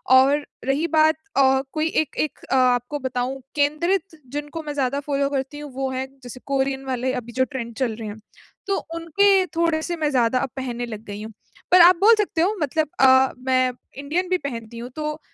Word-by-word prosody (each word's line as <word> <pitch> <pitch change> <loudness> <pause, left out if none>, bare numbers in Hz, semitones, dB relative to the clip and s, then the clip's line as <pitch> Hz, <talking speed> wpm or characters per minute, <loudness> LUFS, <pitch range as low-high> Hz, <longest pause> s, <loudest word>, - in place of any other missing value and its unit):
और 280 +3 +4 0.2
रही 285 +5 +1
बात 315 0 +4 0.2
अ, 265 -1 +4
कोई 310 +1 0
एक 310 -3 -1
एक 305 - -2
अ, - - +3
आपको 250 +2 +2
बताऊँ 260 +1 -3
केंद्रित 320 +4 0
जिनको 295 +2 -5
मैं 295 -1 -5
ज़्यादा 275 0 0
फ़ॉलो 280 -1 -1
करती 280 +1 -3
हूँ, 295 -2 -8
वो 265 +1 -2
हैं 260 0 -3 0.2
जैसे 245 +1 -9
कोरियन 270 -1 -1
वाले 255 0 -1
अभी 240 -2 -5
जो 260 - +2
ट्रेंड 245 -4 -6
चल 240 -4 -1
रहे 220 -1 -7
हैं। 205 - -8 0.5
तो 395 - +1 0.2
उनके 375 +4 +3
थोड़े-से 335 0 0
मैं 305 -2 0
ज़्यादा 250 -1 +2
अब 270 0 -2
पहनने 245 -2 -3
लग 215 -2 -8
गई 205 +1 -7
हूँ, 220 - -9 0.4
पर 360 0 +8
आप 360 +2 +8
बोल 450 +3 +7
सकते 355 -6 0
हो 405 +5 +2
मतलब 305 +1 0
अ, 260 0 +6
मैं 255 0 +1 0.3
इंडियन 330 +6 -2
भी 370 - +2
पहनती 235 -6 -6
हूँ। 245 - -7
तो 305 0 -3
275 Hz, 200 wpm, -23 LUFS, 255-315 Hz, 0.5 s, पर